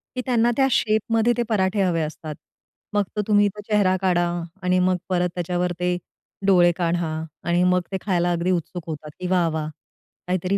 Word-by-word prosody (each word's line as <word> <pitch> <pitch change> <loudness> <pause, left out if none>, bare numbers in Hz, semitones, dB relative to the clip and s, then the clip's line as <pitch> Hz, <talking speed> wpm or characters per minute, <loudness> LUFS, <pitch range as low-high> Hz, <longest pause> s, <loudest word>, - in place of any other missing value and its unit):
की 255 - -1
त्यांना 240 -2 +3
त्या 270 - +4
शेपमध्ये 225 +2 +2
ते 240 - +2
पराठे 195 -1 +1
हवे 170 -3 +1
असतात. 155 0 -5 0.6
मग 205 - +3
तो 210 - +1
तुम्ही 205 -1 +5
इथं 210 +1 -3
चेहरा 200 -3 +3
काढा 180 -2 +2 0.4
आणि 180 0 +2
मग 180 0 +2
परत 180 -1 +1
त्याच्यावर 180 0 -1
ते 180 0 0 0.5
डोळे 175 -3 +5
काढा 170 -2 0 0.4
आणि 175 +1 +3
मग 180 0 +3
ते 190 - -1
खायला 175 -3 +1
अगदी 175 +2 0
उत्सुक 175 0 -2
होतात, 155 -1 -6
की 180 - -3
वाह 180 -2 +2
वाह! 155 -1 -3 0.6
काहीतरी 185 +2 0
180 Hz, 180 wpm, -23 LUFS, 175-205 Hz, 0.6 s, तुम्ही